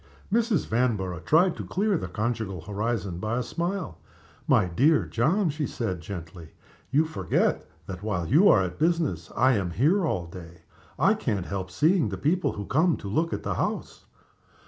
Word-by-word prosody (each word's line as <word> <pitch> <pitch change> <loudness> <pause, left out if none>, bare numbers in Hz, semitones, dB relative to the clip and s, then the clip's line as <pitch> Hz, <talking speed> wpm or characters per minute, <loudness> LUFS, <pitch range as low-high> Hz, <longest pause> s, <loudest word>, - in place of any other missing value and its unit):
Mrs. 230 -6 +2
Vanborough 105 -7 0
tried 165 - +3
to - - -5
clear 205 +1 0
the 155 - -3
conjugal 105 -2 -3
horizon 100 -1 -3
b 110 - -4
y 115 +2 0
a 125 - 0
smile. 170 - -4 0.5
"My - - +4
dear 135 - +3
John," 165 - +1
she 150 -1 -3
said, 95 -8 -3
gently, 85 -2 -9 0.4
"you 150 +4 +3
forget 160 0 -1 0.2
that, 90 0 -7
while 100 -6 -2
you 170 - +5
are 95 - +5
at 90 -1 -5
business, 155 - 0
I 130 - +4
am 95 -3 -1
here 160 - +2
all 90 - -1
day. 85 -1 -12 0.3
I - - +4
can't 95 -4 -2
help 95 -1 -4
seeing 155 - +2
the 95 - -4
people 170 - 0
who 100 - -6
come 160 - +2
to 100 - -8
look 160 +12 0
at - - -4
the - - -1
house. - - -4
110 Hz, 180 wpm, -26 LUFS, -, 0.5 s, you